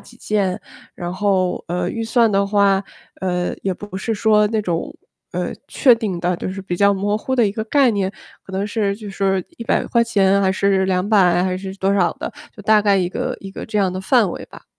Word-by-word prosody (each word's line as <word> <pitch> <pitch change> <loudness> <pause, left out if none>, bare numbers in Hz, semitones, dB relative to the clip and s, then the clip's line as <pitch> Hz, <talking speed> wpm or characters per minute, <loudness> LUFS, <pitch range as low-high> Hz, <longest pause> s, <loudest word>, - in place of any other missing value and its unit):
几 240 - -17
件。 200 -5 -1 0.4
然 175 -1 -5
后， 185 -2 0
呃， 175 +1 -1
预 230 - -4
算 225 -1 +2
的 200 0 +2
话， 200 -1 +3 0.4
呃， 180 -1 -1
也 190 -1 -1
不 205 +1 -10
是 225 +3 -2
说 210 0 +3
那 220 0 0
种， 170 -3 -3 0.4
呃， - - -2 0.2
确 255 -5 +5
定 210 -6 -3
的， 175 +1 0
就 - - -5
是 190 +1 -5
比 180 -2 -3
较 200 +1 +4
模 205 +2 0
糊 260 +4 -2
的 235 -4 +4
一 195 - -2
个 220 +1 -3
概 270 +2 +3
念。 195 -3 -1 0.3
可 190 - -13
能 195 +2 -1
是 205 -2 -1
就 210 -2 -8
是 195 -1 0
￥100， 205 -4 +2
还 190 -1 +2
是 190 0 +1
￥200， 185 -1 +3
还 185 0 -1
是 190 0 -6
多 195 0 +1
少 185 -3 +3
的。 - - -6 0.2
就 205 - -10
大 215 +1 +4
概 205 -1 +3
一 185 -2 +1
个 - - -3
一 195 - -9
个 - - -8
这 220 - -4
样 195 -3 +2
的 185 - -4
范 215 0 +3
围 - - -7
吧。 - - -14
200 Hz, 225 characters per minute, -20 LUFS, 190-215 Hz, 0.4 s, 确